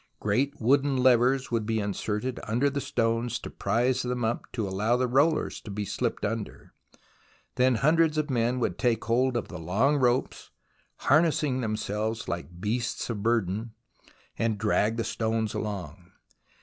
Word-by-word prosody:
Great 135 Hz, +8 st, 0 dB
wooden 135 Hz, +3 st, +2 dB
levers 125 Hz, +1 st, +3 dB
would 115 Hz, -2 st, +1 dB
be 110 Hz, +1 st, -1 dB
inserted 105 Hz, +4 st, -2 dB
under 125 Hz, +6 st, +1 dB
the 140 Hz, +1 st, -2 dB
stones 115 Hz, 0 st, 0 dB
to -, -, -8 dB
prise 125 Hz, +2 st, +1 dB
them 125 Hz, -1 st, -2 dB
up 115 Hz, +2 st, -3 dB
to 110 Hz, -4 st, -2 dB
allow 105 Hz, +6 st, +1 dB
the 125 Hz, -, +1 dB
rollers 145 Hz, +6 st, +1 dB
to -, -, -10 dB
be 105 Hz, +1 st, -3 dB
slipped -, -, -2 dB
under; 110 Hz, 0 st, -5 dB, 0.8 s
then 125 Hz, 0 st, +3 dB
hundreds 155 Hz, +5 st, +3 dB
of 155 Hz, -1 st, +1 dB
men 120 Hz, -2 st, 0 dB
would 90 Hz, -7 st, -1 dB
take 120 Hz, -2 st, +1 dB
hold 125 Hz, +2 st, +2 dB
of 115 Hz, -, -3 dB
the -, -, -8 dB
long 110 Hz, -, +2 dB
ropes, 125 Hz, -1 st, 0 dB, 0.5 s
harnessing 150 Hz, -3 st, +2 dB
themselves 110 Hz, 0 st, -2 dB
like 85 Hz, 0 st, -5 dB
beasts 115 Hz, +4 st, -2 dB
of 105 Hz, -3 st, -4 dB
burden, 110 Hz, 0 st, 0 dB, 0.6 s
and 115 Hz, -2 st, +1 dB
drag 105 Hz, +1 st, +1 dB
the 115 Hz, -, 0 dB
stones 110 Hz, -1 st, -1 dB
along. 95 Hz, -4 st, -5 dB
115 Hz, 155 wpm, -27 LUFS, 105-130 Hz, 0.8 s, levers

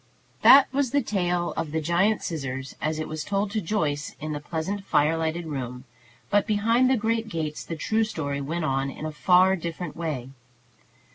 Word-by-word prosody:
That 275 Hz, 0 st, +9 dB
was 275 Hz, -2 st, +1 dB
the 285 Hz, +2 st, +1 dB
tale 175 Hz, -5 st, -1 dB
of 165 Hz, -2 st, -2 dB
the 160 Hz, +2 st, -1 dB
giant 175 Hz, +7 st, +1 dB
scissors 135 Hz, -4 st, -4 dB
as 155 Hz, 0 st, -1 dB
it 155 Hz, -, -3 dB
was 155 Hz, -1 st, -4 dB
told 200 Hz, +2 st, -1 dB
to 215 Hz, 0 st, -1 dB
Joyce 155 Hz, -6 st, -2 dB
in 155 Hz, +1 st, -4 dB
the 150 Hz, -, -3 dB
pleasant 165 Hz, +6 st, -4 dB
fire 155 Hz, -3 st, +2 dB
lighted 165 Hz, +1 st, -2 dB
room; 125 Hz, -4 st, -5 dB, 0.5 s
but 205 Hz, 0 st, +3 dB
behind 230 Hz, +4 st, +3 dB
the 260 Hz, -, +3 dB
great 225 Hz, +1 st, -1 dB
gates 155 Hz, -5 st, -3 dB
the 165 Hz, -, -5 dB
true 220 Hz, +8 st, +1 dB
story 145 Hz, -10 st, -3 dB
went 160 Hz, +4 st, -2 dB
on 135 Hz, -1 st, 0 dB
in 150 Hz, -, -7 dB
a 155 Hz, -, -3 dB
far 185 Hz, +4 st, +4 dB
different 170 Hz, -2 st, -5 dB
way. 150 Hz, -7 st, -4 dB
165 Hz, 190 wpm, -25 LUFS, 150-205 Hz, 0.5 s, That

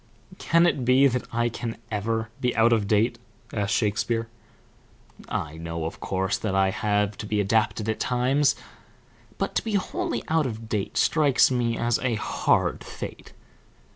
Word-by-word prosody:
"Can 170 Hz, +1 st, +3 dB
it 145 Hz, -6 st, +1 dB
be 130 Hz, +3 st, +5 dB
that 125 Hz, -2 st, +1 dB
I 120 Hz, 0 st, +1 dB
can 115 Hz, 0 st, -5 dB
ever 110 Hz, +2 st, -1 dB
be 125 Hz, -1 st, 0 dB
out 115 Hz, +1 st, +5 dB
of 105 Hz, -3 st, +1 dB
date?" 115 Hz, +4 st, +2 dB, 0.3 s
asked 100 Hz, -2 st, 0 dB
Shakespeare. 115 Hz, +2 st, 0 dB, 1.0 s
"I 75 Hz, +2 st, -3 dB
know, 85 Hz, 0 st, -4 dB
of 80 Hz, -, -5 dB
course, 95 Hz, +1 st, -1 dB
that 100 Hz, -3 st, -2 dB
I 95 Hz, 0 st, +3 dB
have 105 Hz, 0 st, 0 dB
to 105 Hz, -, -5 dB
be 105 Hz, 0 st, 0 dB
adapted 110 Hz, +1 st, +1 dB
at 110 Hz, -, -1 dB
times; 130 Hz, +3 st, +2 dB, 0.8 s
but -, -, -2 dB
to -, -, 0 dB
be 220 Hz, -2 st, -2 dB
wholly 350 Hz, -, -2 dB
out 160 Hz, -3 st, +2 dB
of 115 Hz, -1 st, -6 dB
date 105 Hz, -3 st, -2 dB
strikes 145 Hz, -5 st, +4 dB
me 120 Hz, -2 st, 0 dB
as 120 Hz, -1 st, +1 dB
a 125 Hz, -3 st, 0 dB
hard 105 Hz, -, 0 dB
fate." -, -, -8 dB
115 Hz, 165 wpm, -25 LUFS, 105-125 Hz, 1.0 s, be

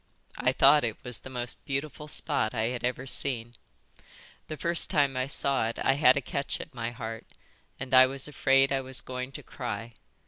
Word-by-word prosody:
I 125 Hz, +1 st, +3 dB
thought 140 Hz, +2 st, +6 dB
it 115 Hz, -2 st, -2 dB
was 125 Hz, -3 st, -3 dB
the -, -, -10 dB
most 125 Hz, -1 st, -4 dB
beautiful 150 Hz, +1 st, -4 dB
spot 140 Hz, -6 st, -1 dB
I 110 Hz, 0 st, +1 dB
had 125 Hz, -1 st, -4 dB
ever 125 Hz, +1 st, -1 dB
seen. 120 Hz, -3 st, -2 dB, 0.9 s
The 155 Hz, -, -6 dB
first 170 Hz, +2 st, 0 dB
time 140 Hz, -6 st, +2 dB
I 130 Hz, +1 st, -1 dB
saw 140 Hz, -4 st, +1 dB
it 115 Hz, -, -5 dB
I 135 Hz, -, +5 dB
had 135 Hz, -2 st, +5 dB
a -, -, +1 dB
catch 140 Hz, +2 st, -3 dB
at 155 Hz, -, -9 dB
my 115 Hz, -2 st, -3 dB
heart, 115 Hz, -2 st, -7 dB, 0.5 s
and 135 Hz, -1 st, -6 dB
I 130 Hz, 0 st, +9 dB
was 135 Hz, +1 st, -3 dB
afraid 135 Hz, -1 st, +3 dB
I 135 Hz, -1 st, +1 dB
was 130 Hz, 0 st, -3 dB
going 125 Hz, +1 st, -5 dB
to -, -, -8 dB
cry. 115 Hz, -2 st, -5 dB
130 Hz, 200 wpm, -28 LUFS, 120-140 Hz, 0.9 s, I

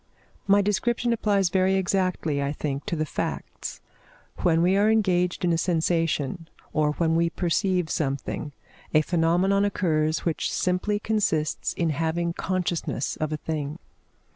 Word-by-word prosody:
My 200 Hz, 0 st, +5 dB
description 235 Hz, +4 st, +1 dB
applies 200 Hz, -5 st, +2 dB
very 190 Hz, 0 st, +3 dB
exactly, 185 Hz, -6 st, 0 dB
I 140 Hz, +1 st, -1 dB
think, 140 Hz, 0 st, -4 dB
to 190 Hz, -, -1 dB
the 155 Hz, -1 st, -1 dB
facts. -, -, -5 dB, 0.6 s
When 165 Hz, -1 st, +2 dB
we 185 Hz, +2 st, +3 dB
are 205 Hz, +2 st, +4 dB
engaged 180 Hz, -5 st, +2 dB
in 175 Hz, -, +3 dB
a 165 Hz, -, +1 dB
sensation, 165 Hz, -2 st, 0 dB, 0.2 s
or 150 Hz, -1 st, +2 dB
when 165 Hz, 0 st, +1 dB
we 170 Hz, 0 st, +2 dB
perceive 180 Hz, +1 st, 0 dB
something, 140 Hz, 0 st, -2 dB, 0.4 s
a 155 Hz, -, +7 dB
phenomenon 180 Hz, +4 st, +2 dB
occurs 155 Hz, -6 st, 0 dB
which 165 Hz, -2 st, -1 dB
simply 185 Hz, +3 st, 0 dB
consists 205 Hz, -9 st, 0 dB
in 165 Hz, -2 st, 0 dB
having 165 Hz, +3 st, -1 dB
consciousness 180 Hz, -2 st, -2 dB
of 155 Hz, -1 st, -2 dB
a 155 Hz, -, -1 dB
thing. 150 Hz, -1 st, -4 dB
170 Hz, 140 wpm, -25 LUFS, 155-190 Hz, 0.6 s, a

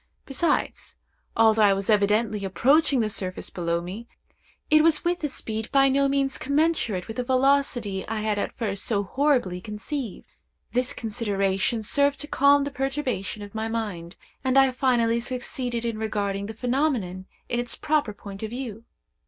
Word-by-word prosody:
Besides, 305 Hz, +5 st, -1 dB, 0.4 s
although 220 Hz, -1 st, +5 dB
I 205 Hz, -2 st, +6 dB
was 195 Hz, 0 st, -3 dB
evidently 210 Hz, 0 st, +2 dB
approaching 260 Hz, -, +3 dB
the 220 Hz, -, +1 dB
surface 185 Hz, -3 st, -4 dB
below 170 Hz, -1 st, -1 dB
me, 195 Hz, +7 st, -7 dB, 0.6 s
it 310 Hz, 0 st, +7 dB
was 325 Hz, -1 st, +3 dB
with 345 Hz, -1 st, 0 dB
a -, -, +2 dB
speed 220 Hz, -5 st, -5 dB
by 275 Hz, -1 st, +5 dB
no 275 Hz, +1 st, +3 dB
means 275 Hz, -1 st, 0 dB
commensurate 280 Hz, -, 0 dB
with 225 Hz, -, -7 dB
the 250 Hz, -, 0 dB
velocity 255 Hz, -6 st, +1 dB
I 220 Hz, 0 st, -2 dB
had 210 Hz, -1 st, 0 dB
at -, -, -4 dB
first 200 Hz, -4 st, -2 dB
so 205 Hz, -3 st, +1 dB
horribly 245 Hz, -6 st, +1 dB
conceived. 220 Hz, +4 st, -5 dB, 0.5 s
This 250 Hz, +2 st, 0 dB
consideration 205 Hz, -1 st, -1 dB
served 280 Hz, +5 st, +2 dB
to 295 Hz, -, -4 dB
calm 280 Hz, 0 st, +4 dB
the 285 Hz, -, -3 dB
perturbation 265 Hz, -7 st, -3 dB
of 205 Hz, -, -10 dB
my 220 Hz, 0 st, -2 dB
mind, 205 Hz, -7 st, -4 dB, 0.3 s
and 260 Hz, 0 st, +2 dB
I 270 Hz, -1 st, +6 dB
finally 240 Hz, -3 st, +2 dB
succeeded 245 Hz, -1 st, -4 dB
in 230 Hz, -2 st, -2 dB
regarding 200 Hz, -2 st, -2 dB
the 220 Hz, -, -7 dB
phenomenon 240 Hz, -, -1 dB, 0.2 s
in 240 Hz, -, -1 dB
its 240 Hz, -1 st, -2 dB
proper 300 Hz, -7 st, 0 dB
point 200 Hz, -1 st, -10 dB
of 220 Hz, -, -3 dB
view. 230 Hz, -2 st, -6 dB
230 Hz, 165 wpm, -25 LUFS, 205-270 Hz, 0.6 s, it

